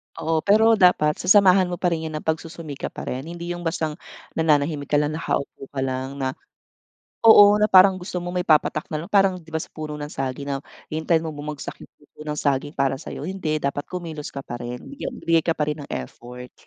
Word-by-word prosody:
Oo, 165 Hz, 0 st, 0 dB
pero 220 Hz, +2 st, +5 dB
dapat 155 Hz, -5 st, +4 dB
sasamahan 190 Hz, -1 st, +5 dB
mo 180 Hz, -, -3 dB
pa 175 Hz, 0 st, 0 dB
rin 160 Hz, -1 st, -2 dB
yan 155 Hz, -, -6 dB
ng 155 Hz, -, -5 dB
pagsusumikap 160 Hz, -2 st, -4 dB
pa -, -, -6 dB
rin. 130 Hz, +4 st, -5 dB
Hindi 170 Hz, +1 st, -6 dB
yung 175 Hz, 0 st, -6 dB
bastang 160 Hz, -2 st, -2 dB, 0.4 s
nanahimik 150 Hz, -2 st, +1 dB
ka -, -, 0 dB
lang, 150 Hz, +1 st, +1 dB
nakaupo 140 Hz, -3 st, -3 dB
ka 135 Hz, -, -2 dB
lang 130 Hz, +1 st, -3 dB
na 130 Hz, -1 st, -1 dB, 1.0 s
oo, 205 Hz, -1 st, +8 dB
na 210 Hz, -, +4 dB
parang 185 Hz, 0 st, +7 dB
gusto 180 Hz, 0 st, -5 dB
mo 175 Hz, -, -4 dB
may 180 Hz, -1 st, 0 dB
papatak 155 Hz, 0 st, +2 dB
na 155 Hz, 0 st, -3 dB
lang. -, -, -14 dB
Parang 195 Hz, -2 st, +4 dB
'di 160 Hz, -2 st, -15 dB
ba 160 Hz, -, 0 dB
sa -, -, -9 dB
puno 155 Hz, -1 st, -6 dB
ng 145 Hz, -, -5 dB
saging 135 Hz, +1 st, -4 dB
na 140 Hz, -, -1 dB, 0.3 s
hintayin 160 Hz, +1 st, +1 dB
mo 160 Hz, -, -3 dB
bumagsak 150 Hz, 0 st, -6 dB
yung -, -, -16 dB
puso 145 Hz, -, -26 dB
ng 150 Hz, -1 st, -3 dB
saging 145 Hz, +1 st, 0 dB
para 135 Hz, 0 st, +1 dB
sa'yo, 140 Hz, -, -8 dB
hindi. 165 Hz, -5 st, -2 dB
Dapat 140 Hz, +1 st, -2 dB
kumilos 165 Hz, -5 st, -6 dB
ka 140 Hz, -, -5 dB
pa 120 Hz, -, -6 dB
rin. 120 Hz, 0 st, -6 dB
Bigya 280 Hz, -, -6 dB
bigay 165 Hz, -1 st, +1 dB
ka 165 Hz, -, +2 dB
pa 150 Hz, -2 st, -2 dB
rin 150 Hz, 0 st, -2 dB
ng -, -, -13 dB
effort. 125 Hz, -, -8 dB
155 Hz, 220 wpm, -23 LUFS, 145-175 Hz, 1.0 s, oo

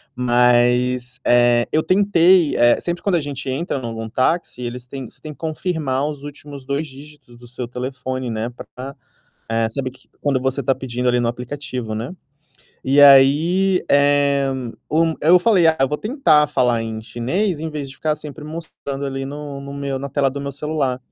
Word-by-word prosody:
Mas, 125 Hz, 0 st, +2 dB
eh, 120 Hz, -1 st, +4 dB
eu 155 Hz, -, +2 dB
tentei 185 Hz, -3 st, +4 dB
eh, 120 Hz, 0 st, +4 dB
sempre 175 Hz, 0 st, -3 dB
quando 200 Hz, -3 st, +1 dB
a 170 Hz, -, +1 dB
gente 140 Hz, -2 st, -5 dB
entra 140 Hz, +2 st, -2 dB
em -, -, -10 dB
algum 115 Hz, -1 st, -5 dB
táxi 130 Hz, +4 st, -1 dB
eles 120 Hz, 0 st, -5 dB
têm 130 Hz, -1 st, -8 dB
você -, -, -15 dB
tem 155 Hz, -1 st, -8 dB
que -, -, -24 dB
confirmar 155 Hz, -4 st, -2 dB
os 150 Hz, -2 st, -6 dB
últimos 145 Hz, -2 st, -10 dB
2 140 Hz, +3 st, -1 dB
dígitos 145 Hz, -2 st, -14 dB
do 120 Hz, -, -14 dB
seu 125 Hz, 0 st, -6 dB
telefone, 130 Hz, 0 st, -4 dB
né, 110 Hz, 0 st, -2 dB
pra, 130 Hz, +2 st, -10 dB, 0.5 s
eh, 115 Hz, 0 st, +1 dB
saber 130 Hz, +2 st, -3 dB
q 130 Hz, +1 st, -22 dB
quando 140 Hz, -3 st, 0 dB
você 135 Hz, +1 st, -1 dB
está 135 Hz, 0 st, +1 dB
pedindo 125 Hz, -1 st, -3 dB
ali 125 Hz, 0 st, +3 dB
no 120 Hz, -, 0 dB
aplicativo, 125 Hz, -2 st, -5 dB
né. 115 Hz, +9 st, -5 dB, 0.7 s
E 135 Hz, +2 st, +1 dB
aí, 155 Hz, +8 st, +5 dB
eh, 140 Hz, -1 st, +3 dB, 0.4 s
o 160 Hz, +1 st, +2 dB
eu 175 Hz, +4 st, +6 dB
falei: 185 Hz, -3 st, +4 dB
"Ah, 160 Hz, 0 st, +4 dB
eu 135 Hz, -, +3 dB
vou 150 Hz, -, -2 dB
tentar 210 Hz, -, +3 dB
falar 125 Hz, -5 st, +1 dB
em 110 Hz, -1 st, -5 dB
chinês 145 Hz, -, -2 dB
invés 150 Hz, -3 st, -5 dB
de -, -, -11 dB
ficar 155 Hz, -1 st, -1 dB
sempre 150 Hz, 0 st, -9 dB
mostrando 150 Hz, -3 st, -6 dB
ali 135 Hz, -1 st, -3 dB
no 145 Hz, 0 st, -7 dB
no 140 Hz, 0 st, -8 dB
meu 140 Hz, -1 st, -3 dB
na 140 Hz, +1 st, -5 dB
tela 140 Hz, 0 st, +1 dB
do 140 Hz, +2 st, -6 dB
meu 140 Hz, 0 st, -4 dB
celular". 140 Hz, -3 st, -2 dB
140 Hz, 190 wpm, -20 LUFS, 125-150 Hz, 0.7 s, eu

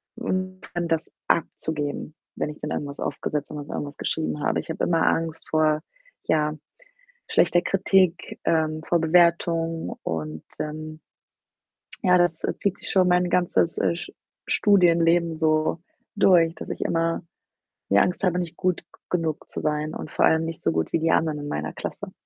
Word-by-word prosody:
und 185 Hz, -5 st, -3 dB
dann 175 Hz, -1 st, -1 dB
das 165 Hz, 0 st, -1 dB, 0.2 s
abzugeben, 155 Hz, -2 st, -1 dB, 0.2 s
wenn -, -, -1 dB
ich 150 Hz, -, -9 dB
dann 150 Hz, -, -4 dB
irgendwas 140 Hz, -1 st, -4 dB
aufgesetzt 145 Hz, 0 st, -3 dB
wenn 150 Hz, -, -6 dB
dann 145 Hz, -, -6 dB
so -, -, -6 dB
irgendwas 145 Hz, 0 st, -5 dB
geschrieben 155 Hz, -2 st, -2 dB
habe. -, -, +1 dB
Ich -, -, -17 dB
habe 160 Hz, -, -1 dB
immer 165 Hz, -2 st, +2 dB
Angst 165 Hz, -1 st, -1 dB
vor, 155 Hz, -1 st, +2 dB, 0.5 s
ja, 150 Hz, -1 st, +2 dB, 0.7 s
schlechter 175 Hz, -, +3 dB
Kritik, 190 Hz, -2 st, +1 dB
ähm, 155 Hz, -1 st, +1 dB
vor 170 Hz, -, +2 dB
Bewertung 165 Hz, 0 st, +2 dB
und, 80 Hz, -1 st, -4 dB, 0.2 s
ähm 155 Hz, +1 st, -5 dB, 1.0 s
ja, 180 Hz, 0 st, +5 dB
das, 175 Hz, -2 st, +1 dB
äh, -, -, 0 dB
zieht 200 Hz, -1 st, -1 dB
sich -, -, -4 dB
schon 185 Hz, -2 st, +4 dB
mein 180 Hz, 0 st, +3 dB
ganzes, 175 Hz, -2 st, +2 dB
äh, 170 Hz, -, +1 dB
Sch -, -, -7 dB, 0.4 s
Studienleben 170 Hz, -4 st, +4 dB
so 155 Hz, 0 st, +1 dB, 0.4 s
durch, 175 Hz, -5 st, +5 dB
dass -, -, -8 dB
ich -, -, -5 dB
immer 165 Hz, 0 st, 0 dB, 0.7 s
die 100 Hz, -, +5 dB
Angst 180 Hz, -, +2 dB
habe, 180 Hz, -1 st, +2 dB
nicht 175 Hz, -2 st, -4 dB
gut 185 Hz, -1 st, 0 dB
g -, -, -33 dB, 0.2 s
genug 165 Hz, -4 st, -2 dB
zu -, -, -4 dB
sein 150 Hz, 0 st, -1 dB
und -, -, -7 dB
vor -, -, +1 dB
allem 160 Hz, 0 st, +4 dB
nicht 165 Hz, -1 st, -5 dB
so 85 Hz, -, +1 dB
gut 80 Hz, 0 st, -1 dB
wie -, -, +3 dB
die 165 Hz, +1 st, +1 dB
anderen 155 Hz, -2 st, +2 dB
in 145 Hz, 0 st, -6 dB
meiner 75 Hz, -, -3 dB
Klasse. -, -, -6 dB
165 Hz, 175 wpm, -25 LUFS, 155-175 Hz, 1.0 s, ja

